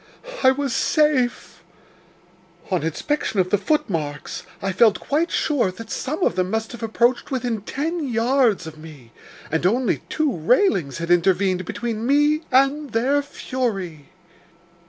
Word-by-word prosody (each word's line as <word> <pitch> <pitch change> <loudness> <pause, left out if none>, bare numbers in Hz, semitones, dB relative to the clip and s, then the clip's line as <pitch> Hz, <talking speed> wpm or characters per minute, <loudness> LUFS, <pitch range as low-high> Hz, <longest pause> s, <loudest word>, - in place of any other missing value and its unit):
I 260 - +6
was 270 -2 -1
safe. 300 -6 +1 1.1
On 185 - +1
inspection 200 - -2
of 185 0 +1
the 205 - +4
footmarks, 165 - -2 0.2
I 195 - -2
felt 215 +2 +4
quite 315 +4 0
sure 280 -10 +1
that 230 +3 -10
some 310 +7 -3
of 175 - +2
them 185 0 0
must 220 +1 -2
have 240 - -9
approached 235 +2 +1
within 245 -5 -2
ten 305 - -3
yards 235 -3 +2
of 155 -1 -9
me, 150 -7 -13 0.4
and 160 +1 0
only 235 +7 +1
two 305 -4 0
railings 175 - +2
had 170 +1 -3
intervened 185 +1 +2
between 230 +3 -3
me 295 +2 +3
and 275 +3 +3
their 265 +6 +2
fury. 195 - -4
230 Hz, 140 wpm, -22 LUFS, 185-275 Hz, 1.1 s, I